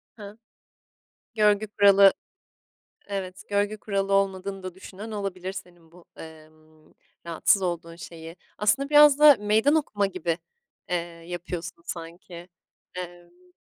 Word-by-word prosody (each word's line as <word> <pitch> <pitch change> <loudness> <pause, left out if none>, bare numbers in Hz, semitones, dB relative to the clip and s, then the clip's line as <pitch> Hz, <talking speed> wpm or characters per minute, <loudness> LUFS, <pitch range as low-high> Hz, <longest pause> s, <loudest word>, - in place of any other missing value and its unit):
Hıı? 205 0 -11 1.0
Görgü 210 -1 +3
kuralı 200 -1 +6 1.0
Evet, 190 -2 -5
görgü 205 +1 0
kuralı 195 -1 -2
olmadığını 195 0 0
da 185 -1 -7
düşünen 200 +3 -10
olabilir 190 -3 -5
senin 175 -3 -12
bu, 175 -1 -17
emm, 155 -1 -15 0.3
rahatsız 170 +4 +2
olduğun 170 -2 -4
şeyi. 165 0 -10 0.2
Aslında 215 +7 +1
biraz 295 -1 +7
da 300 -3 +8
meydan 220 +8 +3
okuma 205 -10 0
gibi, 175 -3 -3 0.5
eee, 180 - 0 0.3
yapıyorsun 175 -1 -6
sanki. 170 +1 -9 0.5
Emm 175 0 -10
190 Hz, 115 wpm, -25 LUFS, 175-205 Hz, 1.0 s, da